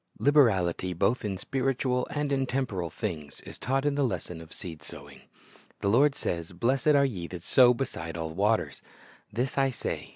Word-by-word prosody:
Liberality 95 - +3
both 100 +8 +1
in 100 -3 -2
spiritual 130 +2 -1
and 145 -1 -2
in 135 -1 +1
temporal 110 -11 -2
things 80 -6 -5
is - - -10
taught 135 +2 0
in 145 - +2
the 140 0 +1
lesson 90 -8 -3
of 80 0 -13
seed 80 -4 -8
sowing. - - -10 0.6
The 100 - +1
Lord 135 +6 +4
sa}\s, 85 +1 -3
"Blessed 125 - 0
are 140 0 +5
ye 95 -10 -3
that 90 -1 -8
sow 125 +2 +6
beside 85 -11 -4
all 80 -1 -4
waters." 105 +5 +1 0.5
"This 125 +5 -2
1 135 -1 +3
say. - - -4
115 Hz, 175 wpm, -28 LUFS, 90-135 Hz, 0.6 s, sow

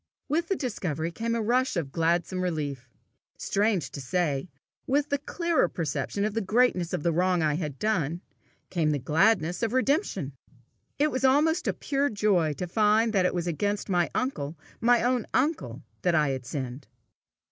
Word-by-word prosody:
With 330 +4 0
the 390 - +1
discovery 175 - -3
came 230 +5 -2
a 230 - -1
rush 250 0 +1
of 145 -5 -2
gladsome 170 +3 0
relief. 145 -7 -3 0.5
Strange 200 -8 0
to 140 - -6
say, 150 +1 -1 0.4
with 285 +2 +1
the 285 - 0
clearer 335 - 0
perception 160 +5 -2
of 215 - -1
the 225 - 0
greatness 200 -4 +2
of - - -2
the 170 - +2
wrong 180 0 +2
I 155 -1 +2
had 150 -3 -3
done, 170 -5 0 0.5
came 165 -4 +1
the 150 - +1
gladness 165 - +2
of 230 0 0
redemption. 260 - 0 0.6
It 300 +1 +2
was 260 - -2
almost 310 +6 +3
a - - +2
pure 280 0 0
joy 195 -7 +2
to 180 - -4
find 215 +4 +2
that 185 -3 +3
it - - -3
was 175 -1 -1
against 205 +5 -1
my 175 -2 +2
uncle, 165 - -2 0.2
my 240 0 +4
own 245 -2 +1
uncle, 300 +5 0 0.2
that 175 -2 +2
I 150 -3 +3
had 130 -2 -4
sinned! 130 -1 -5
185 Hz, 175 wpm, -27 LUFS, 160-245 Hz, 0.6 s, my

